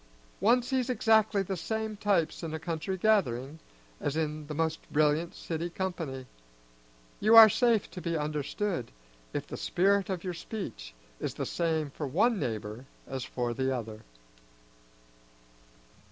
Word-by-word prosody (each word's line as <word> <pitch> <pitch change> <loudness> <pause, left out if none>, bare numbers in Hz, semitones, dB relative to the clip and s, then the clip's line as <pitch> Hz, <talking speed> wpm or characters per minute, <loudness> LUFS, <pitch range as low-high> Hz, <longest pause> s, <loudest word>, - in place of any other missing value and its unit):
One 240 +6 +4
sees 255 0 -1
exactly 220 -3 +3
the 195 0 -3
same 220 +5 -3
types 200 -6 +1
in 160 -2 -4
a - - -4
country 165 +3 -3
gathering 160 - +1 0.4
as 145 +2 -2
in 155 -1 -2
the 150 - -5
most 160 0 0
brilliant 155 +3 +2
city 165 +1 -4
company. 165 -8 -4 0.9
You 220 +2 +5
are 225 -1 +12
safe 230 0 +2
to 180 - -7
be 170 -2 -1
understood 150 - -2 0.4
if - - -3
the - - -7
spirit 195 +2 +2
of 185 -3 -3
your 180 -2 -3
speech 165 - -7 0.2
is - - -3
the - - -3
same 160 -4 -1
for 145 +1 -4
one 205 - +2
neighbor 110 - -4 0.2
as 135 -2 -4
for 120 -1 -2
the 130 +2 0
other. 110 -2 -7
165 Hz, 145 wpm, -30 LUFS, 145-205 Hz, 0.9 s, are